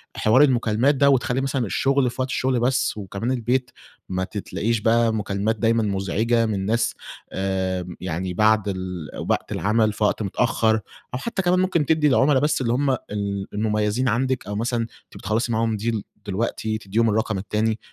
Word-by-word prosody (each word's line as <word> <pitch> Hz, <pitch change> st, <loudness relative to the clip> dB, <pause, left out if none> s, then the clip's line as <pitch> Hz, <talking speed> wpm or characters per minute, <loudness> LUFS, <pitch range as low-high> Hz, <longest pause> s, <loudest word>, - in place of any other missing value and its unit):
حوار 110 Hz, +5 st, +4 dB
المكالمات 125 Hz, 0 st, +2 dB
ده، 140 Hz, +1 st, +4 dB
وتخلّي 130 Hz, -1 st, +2 dB
مثلًا 135 Hz, -2 st, -1 dB
الشغل 135 Hz, +5 st, +1 dB
في 125 Hz, -, -5 dB
وقت 130 Hz, -, -1 dB
الشغل 130 Hz, 0 st, 0 dB
بس، 125 Hz, -1 st, +1 dB
وكمان 100 Hz, +4 st, -3 dB
البيت 125 Hz, 0 st, 0 dB, 0.4 s
ما 95 Hz, 0 st, -1 dB
ت 100 Hz, -, -7 dB
تلاقيش 115 Hz, +3 st, -1 dB
بقى 115 Hz, +1 st, +3 dB
مكالمات 105 Hz, 0 st, -1 dB
دايمًا 115 Hz, 0 st, +2 dB
مزعجة 105 Hz, +4 st, +1 dB
من 100 Hz, -3 st, -2 dB
ناس، 115 Hz, +3 st, +1 dB, 0.4 s
آآ 95 Hz, -1 st, -2 dB
يعني 90 Hz, +1 st, -3 dB
بعد 110 Hz, +1 st, +3 dB
ال 95 Hz, -4 st, -4 dB, 0.2 s
وقت -, -, 0 dB
العمل 110 Hz, +1 st, +1 dB
في 105 Hz, -, -3 dB
وقت 105 Hz, -, +1 dB
متأخّر، 110 Hz, +2 st, +1 dB, 0.4 s
أو 125 Hz, -, -2 dB
حتّى 205 Hz, -, -2 dB
كمان 180 Hz, 0 st, +2 dB
ممكن 185 Hz, -5 st, +1 dB
تدّي 155 Hz, 0 st, +3 dB
العملا 135 Hz, 0 st, +4 dB
بس 150 Hz, 0 st, +1 dB
اللي 120 Hz, -2 st, +1 dB
هُم 140 Hz, +3 st, +1 dB
ال 100 Hz, -5 st, -3 dB
المميّزين 105 Hz, +3 st, 0 dB
عندِك 130 Hz, +3 st, 0 dB
أو 105 Hz, -, -4 dB
مثلًا، 120 Hz, +3 st, -1 dB
أنتِ 115 Hz, -, -10 dB
بتخلّصي 110 Hz, +4 st, -1 dB
معاهم 115 Hz, -1 st, 0 dB
deal 110 Hz, 0 st, -1 dB, 0.2 s
دلوقتي 110 Hz, +2 st, -2 dB
تدّيهم 110 Hz, +2 st, 0 dB
الرقم 110 Hz, -1 st, 0 dB
التاني، 105 Hz, +3 st, -1 dB
110 Hz, 175 wpm, -23 LUFS, 105-125 Hz, 0.4 s, حوار